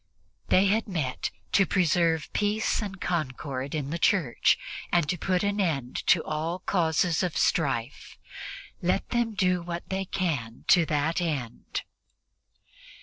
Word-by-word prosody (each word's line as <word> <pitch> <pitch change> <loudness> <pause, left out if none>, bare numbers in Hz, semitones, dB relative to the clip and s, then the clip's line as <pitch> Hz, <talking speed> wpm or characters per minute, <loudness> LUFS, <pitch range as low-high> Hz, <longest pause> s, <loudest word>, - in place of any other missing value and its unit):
They 190 - +5
had 215 +4 +2
met 155 -10 -2 0.2
to 195 -2 +4
preserve 170 -3 +2
peace 210 +2 +1
and 195 -3 -5
concord 140 -4 -3
in 145 -2 -3
the 170 - -2
Church 165 - +3 0.3
and 170 -4 +3
to 180 - 0
put 185 +2 0
an 205 +1 0
end 140 -9 -1
to 170 - +5
all 155 +3 -2
causes 170 -2 +1
of 180 -3 -1
strife. 135 -5 0 0.6
Let - - 0
them 235 -2 0
do 180 -2 +2
what 170 0 -5
they 190 0 -1
can 145 -13 -3
to 170 -3 +6
that 155 +3 0
end. 145 -9 -3
170 Hz, 140 wpm, -27 LUFS, 150-185 Hz, 0.6 s, to